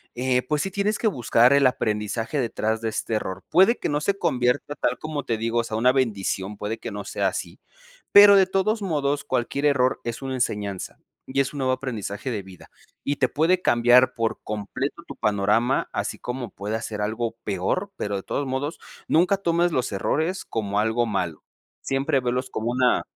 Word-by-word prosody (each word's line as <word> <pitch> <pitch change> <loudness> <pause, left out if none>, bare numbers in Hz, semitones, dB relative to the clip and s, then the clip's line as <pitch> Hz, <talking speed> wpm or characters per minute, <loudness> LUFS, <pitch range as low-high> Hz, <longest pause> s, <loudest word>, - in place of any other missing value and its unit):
eh, 125 0 +1
pues 145 +3 -1
sí, 195 - -3
tienes 205 +2 0
que 225 - 0
buscar 125 - +4
el 140 -1 +4
aprendizaje 110 +3 -1
detrás 110 -2 -1
de 115 - -1
este 110 +1 -3
error. 95 -3 -4
Puede 190 +8 +5
que - - -2
no 145 0 0
se 200 +5 0
convierta 145 -3 0
tal - - -1
como 155 -2 -4
te 115 - -1
digo, 115 +1 0
o - - +1
sea 110 -1 -4
una 125 +3 +4
bendición, 105 -5 -1
puede 105 +2 -4
que 115 - -6
no 100 0 -5
sea - - -1
así, - - -6 0.5
pero 205 0 +9
de 195 -1 +6
todos 195 +4 0
modos, 145 -6 -1
cualquier 140 +4 -1
error 130 -3 +2
es 115 -1 -4
una 135 -1 -4
enseñanza 105 -6 -3 0.3
y 135 +1 -1
es 140 +1 +1
un 145 - -5
nuevo 130 -1 +1
aprendizaje 120 -4 -4
de 105 -4 -2
vida, 95 -2 -14 0.3
y 140 - 0
te 130 - +2
puede 170 +8 +2
cambiar 120 0 +5
por 115 -2 -2
completo 105 -1 -4
tu - - -8
panorama, 105 +5 +1
así - - -3
como 125 -1 -5
pueda 105 +3 -4
ser 105 -2 -5
algo 115 +2 -2
peor. 105 - -1
Pero 100 - -2
de 95 - -6
todos 140 - -2
modos, 145 +5 -3 0.3
nunca 180 +5 +3
tomes 175 -2 +1
los 130 -5 -1
errores 160 - -1
como 105 -2 -2
algo 110 +2 +1
malo. 90 -8 -3 0.4
Siempre 135 +1 +1
velos 125 +1 -1
como 110 +2 -2
una 125 0 +3
125 Hz, 195 wpm, -24 LUFS, 110-145 Hz, 0.5 s, pero